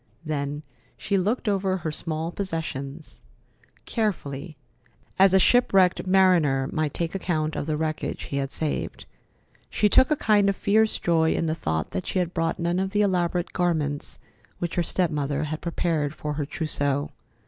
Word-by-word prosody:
Then 145 Hz, -1 st, -3 dB, 0.3 s
she 200 Hz, -, -1 dB
looked 210 Hz, +6 st, 0 dB
over 195 Hz, -2 st, +1 dB
her 160 Hz, -3 st, -3 dB
small 160 Hz, +1 st, -2 dB
possessions 160 Hz, -6 st, -5 dB, 0.6 s
carefully, 160 Hz, -, -3 dB, 0.6 s
as 195 Hz, 0 st, +7 dB
a 190 Hz, -, +5 dB
shipwrecked 190 Hz, -3 st, +4 dB
mariner 175 Hz, -8 st, +4 dB
might 155 Hz, -2 st, -1 dB
take 165 Hz, -1 st, -2 dB
account 160 Hz, -5 st, -1 dB
of 145 Hz, -, -3 dB
the 155 Hz, -1 st, 0 dB
wreckage 155 Hz, 0 st, -3 dB
he 140 Hz, -, -4 dB
had 135 Hz, 0 st, -2 dB
saved. 155 Hz, -2 st, -3 dB, 0.6 s
She 210 Hz, -, +2 dB
took 260 Hz, -, +5 dB
a 305 Hz, -, +3 dB
kind 210 Hz, -6 st, +3 dB
of 200 Hz, -, 0 dB
fierce 215 Hz, +3 st, +2 dB
joy 160 Hz, -2 st, +2 dB
in -, -, 0 dB
the 155 Hz, -, 0 dB
thought 80 Hz, -, -2 dB
that 90 Hz, -, -4 dB
she -, -, -2 dB
had 180 Hz, -1 st, 0 dB
brought 165 Hz, -1 st, 0 dB
none 170 Hz, +1 st, 0 dB
of 190 Hz, +1 st, -2 dB
the 210 Hz, 0 st, +3 dB
elaborate 180 Hz, -2 st, 0 dB
garments 155 Hz, -5 st, -1 dB, 0.4 s
which 170 Hz, -1 st, -3 dB
her 175 Hz, -, +1 dB
step 175 Hz, 0 st, 0 dB
mother 145 Hz, 0 st, -1 dB
had 155 Hz, +1 st, -4 dB
prepared 165 Hz, -4 st, -1 dB
for 150 Hz, -1 st, -4 dB
her 145 Hz, -1 st, -3 dB
trousseau. 145 Hz, -2 st, -1 dB
165 Hz, 170 wpm, -25 LUFS, 150-190 Hz, 0.6 s, as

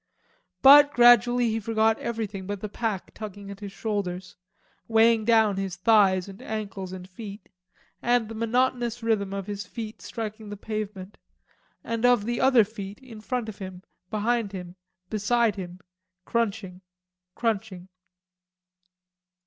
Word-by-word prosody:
But 285 Hz, +2 st, +9 dB
gradually 240 Hz, 0 st, +6 dB
he 220 Hz, +1 st, -1 dB
forgot 220 Hz, 0 st, +1 dB
everything 210 Hz, -5 st, -4 dB
but 205 Hz, 0 st, -4 dB
the 215 Hz, -, -3 dB
pack 210 Hz, -3 st, -3 dB
tugging 205 Hz, -2 st, -8 dB
at 200 Hz, -, -10 dB
his 200 Hz, -2 st, -7 dB
shoulders, 190 Hz, -4 st, -4 dB, 0.5 s
weighing 225 Hz, 0 st, +4 dB
down 220 Hz, -3 st, +4 dB
his 195 Hz, -2 st, -3 dB
thighs 190 Hz, -1 st, +3 dB
and 195 Hz, 0 st, -11 dB
ankles 200 Hz, -4 st, -5 dB
and 185 Hz, -1 st, -8 dB
feet, 200 Hz, +1 st, -10 dB, 0.5 s
and 240 Hz, -2 st, +2 dB
the 225 Hz, -, -8 dB
monotonous 240 Hz, +1 st, 0 dB
rhythm 210 Hz, -4 st, 0 dB
of 195 Hz, -1 st, -4 dB
his 200 Hz, -2 st, -6 dB
feet 220 Hz, +2 st, -7 dB
striking 215 Hz, -1 st, -6 dB
the 205 Hz, -, -7 dB
pavement 210 Hz, -2 st, -6 dB, 0.6 s
and 230 Hz, 0 st, -3 dB
of 245 Hz, -4 st, +4 dB
the 240 Hz, +1 st, -1 dB
other 260 Hz, -3 st, +6 dB
feet, 200 Hz, -1 st, -8 dB
in 240 Hz, -5 st, -12 dB
front 245 Hz, 0 st, -3 dB
of 220 Hz, -, -8 dB
him, 185 Hz, -1 st, -8 dB, 0.3 s
behind 220 Hz, -1 st, -1 dB
him, 180 Hz, -2 st, -7 dB, 0.4 s
beside 220 Hz, +1 st, +1 dB
him, 180 Hz, -2 st, -7 dB, 0.5 s
crunching, 205 Hz, -5 st, -2 dB, 0.5 s
crunching. 210 Hz, -5 st, -2 dB
215 Hz, 140 wpm, -26 LUFS, 195-230 Hz, 0.6 s, But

